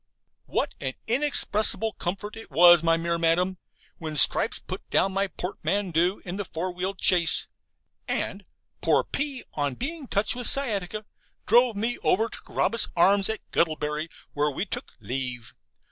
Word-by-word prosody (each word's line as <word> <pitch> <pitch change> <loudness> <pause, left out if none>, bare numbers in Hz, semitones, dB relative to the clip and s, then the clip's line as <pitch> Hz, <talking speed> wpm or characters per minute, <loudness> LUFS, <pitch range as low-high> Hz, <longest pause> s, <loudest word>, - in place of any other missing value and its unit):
What - - -2
an 130 - -3
inexpressible 225 -4 +3
comfort 200 +5 -5
it 225 - -11
was, 175 +3 +6
my 165 0 +2
dear 170 0 -2
Madam, 175 +3 0 0.4
when 155 -2 -5
Stripes - - +5
put - - -7
my 195 +1 0
portmanteau 185 -1 -2
in 180 +1 -6
the 205 - -3
four 180 +2 -5
wheeled 185 +2 -4
chaise, 175 -3 +4 0.6
and - - -3 0.4
(poor - - +2
P 285 -3 -4
on 145 -3 -2
being 305 - -6
touched 215 +2 -1
with 245 -1 +2
sciatica) 215 -6 +1 0.4
drove 240 0 +3
me 230 +4 -2
over 205 +8 +1
to - - -8
'Carabas 230 - 0
Arms' 195 +3 +4
at 220 - -3
Guttlebury, 155 -1 -1 0.3
where 145 +1 0
we 145 +7 -4
took - - -7
leave. 125 -2 -5
185 Hz, 145 wpm, -25 LUFS, 165-220 Hz, 0.6 s, was